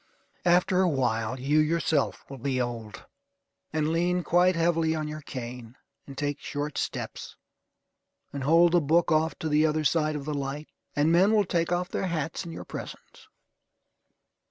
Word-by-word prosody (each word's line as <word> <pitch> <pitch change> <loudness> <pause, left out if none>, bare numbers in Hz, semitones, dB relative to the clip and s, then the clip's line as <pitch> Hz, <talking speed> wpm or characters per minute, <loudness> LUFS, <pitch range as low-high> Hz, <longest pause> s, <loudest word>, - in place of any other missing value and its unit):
After 180 +1 +4
a 185 - +3
while 120 -4 -1
you 145 +4 +2
yourself 155 -2 0
will 135 -1 -9
be 130 +1 -1
old, 115 -3 -5 0.7
and 155 0 0
lean 175 +1 +1
quite 180 +2 +3
heavily 165 -1 +1
on 155 -1 -3
your 155 0 -6
cane, 125 -3 -8 0.3
and 135 -1 -10
take 145 -1 -2
short 145 0 -4
steps, - - -5 1.0
and 140 -2 -4
hold 165 +4 +5
the 175 0 +4
book 165 +4 +2
off 160 +1 +2
to 160 - -4
the 150 0 +3
other 155 0 0
side 155 +1 +1
of 140 -2 -5
the 150 - -3
light. 140 +2 -4 0.3
And 150 +2 +3
men 190 +6 +4
will 205 -2 +3
take 170 -2 0
off 180 +1 0
their 190 - -2
hats 165 -2 -3
in 170 - -8
your - - -8
presence. - - -9
155 Hz, 170 wpm, -27 LUFS, 140-170 Hz, 1.0 s, hold